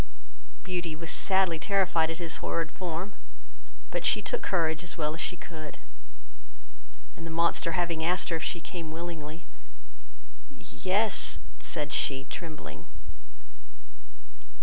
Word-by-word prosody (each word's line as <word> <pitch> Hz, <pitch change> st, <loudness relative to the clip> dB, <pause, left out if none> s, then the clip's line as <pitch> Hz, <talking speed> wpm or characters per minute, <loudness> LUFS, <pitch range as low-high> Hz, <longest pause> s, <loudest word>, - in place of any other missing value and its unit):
Beauty 175 Hz, -4 st, -1 dB
was 165 Hz, +1 st, -3 dB
sadly 190 Hz, -4 st, +4 dB
terrified 185 Hz, -4 st, +3 dB
at 165 Hz, -, -2 dB
his 170 Hz, -1 st, -2 dB
horrid 165 Hz, -1 st, -1 dB
form, 180 Hz, +2 st, -3 dB, 0.8 s
but -, -, -1 dB
she -, -, +4 dB
took -, -, -1 dB
courage 160 Hz, -3 st, +2 dB
as 175 Hz, -, -4 dB
well 155 Hz, -1 st, +1 dB
as 165 Hz, -, -3 dB
she 180 Hz, -, +1 dB
could, 155 Hz, -3 st, -7 dB, 1.4 s
and -, -, -9 dB
the 165 Hz, -, -4 dB
monster 165 Hz, 0 st, +3 dB
having 170 Hz, -2 st, +1 dB
asked 180 Hz, +3 st, +3 dB
her 165 Hz, -, +2 dB
if 160 Hz, -, -5 dB
she 170 Hz, -, 0 dB
came 170 Hz, -2 st, -5 dB
willingly; 165 Hz, 0 st, -5 dB, 1.0 s
"y 275 Hz, -, -15 dB
e 185 Hz, -, -5 dB
s," 210 Hz, +2 st, +4 dB, 0.2 s
said 150 Hz, -3 st, 0 dB
she, 135 Hz, -1 st, +2 dB
trembling. 155 Hz, -, -6 dB
165 Hz, 135 wpm, -30 LUFS, 160-180 Hz, 1.4 s, sadly